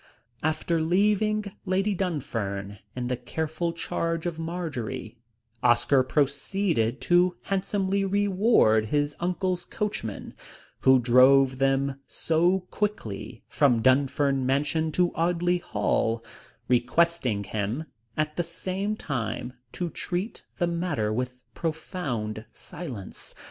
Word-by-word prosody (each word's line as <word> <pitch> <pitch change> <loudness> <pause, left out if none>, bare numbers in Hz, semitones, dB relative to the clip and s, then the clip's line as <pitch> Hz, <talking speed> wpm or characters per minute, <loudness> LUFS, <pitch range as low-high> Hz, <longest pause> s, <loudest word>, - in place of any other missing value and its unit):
After 155 +1 0
leaving 210 +4 +2
Lady 195 +2 +1
Dunfern 105 - -3 0.2
in 125 -1 -2
the 125 - 0
careful 160 +7 -3
charge 165 0 -2
of 170 -2 -3
Marjory, 150 - -4 0.4
Oscar 120 +3 +4
proceeded 140 - 0
to 175 0 +3
handsomely 195 0 0
reward 195 - +3
his 145 +4 0
uncle's 180 0 -1
coachman, 190 - -4 0.5
who 130 0 +6
drove 130 +2 +5
them 135 0 +1
so 175 +4 +2
quickly 115 - -3
from 125 -6 +3
Dunfern 135 +1 +3
Mansion 150 +4 +1
to 180 +1 +2
Audley 175 +1 +1
Hall, 115 -8 0 0.4
requesting 125 -2 +2
him 105 +8 -2 0.3
at 155 0 -1
the 175 - +2
same 185 +5 -3
time 125 - -3 0.2
to 175 -2 -3
treat 185 +5 -3
the 175 - +2
matter 170 -11 -1
with 125 +2 -3
profound 135 -10 -3
silence. 130 - -8
155 Hz, 105 wpm, -27 LUFS, 125-180 Hz, 0.5 s, who